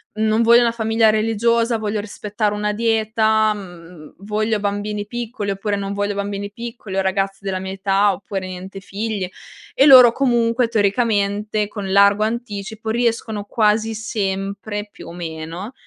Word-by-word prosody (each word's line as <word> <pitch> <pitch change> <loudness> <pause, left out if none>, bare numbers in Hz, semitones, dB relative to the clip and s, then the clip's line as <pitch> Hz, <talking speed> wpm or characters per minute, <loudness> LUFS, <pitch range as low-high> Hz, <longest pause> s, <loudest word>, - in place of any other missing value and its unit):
non 220 +1 +1
voglio 235 +1 +6
una 235 -1 +2
famiglia 225 -1 +2
religiosa, 230 +2 +1
voglio 215 -1 -2
rispettare 210 0 -3
una 210 0 -1
dieta, 220 -1 +2
mhmm, 175 -5 -12
voglio 215 +2 -1
bambini 205 0 -3
piccoli, 230 -3 -4
oppure 200 +1 -2
non 200 0 -4
voglio 205 0 -1
bambini 200 0 -4
piccoli 230 -4 -7
o - - +3
ragazzi 190 +1 0 0.2
della 190 -1 -2
mia 190 0 -5
età, 195 +1 +2
oppure 195 0 -5
niente 185 +1 -8
figli. 200 -1 -4 0.5
E 270 - +5
loro 255 -4 +9
comunque 240 -2 +1
teoricamente 210 -1 0
con 200 -2 -6
largo 200 +1 +5
anticipo 220 -1 -4
riescono 225 -2 -1
quasi 220 +1 +1
sempre, 205 0 -3
più - - -12
o - - -8
meno, 170 +5 -6
210 Hz, 145 wpm, -20 LUFS, 200-225 Hz, 0.5 s, loro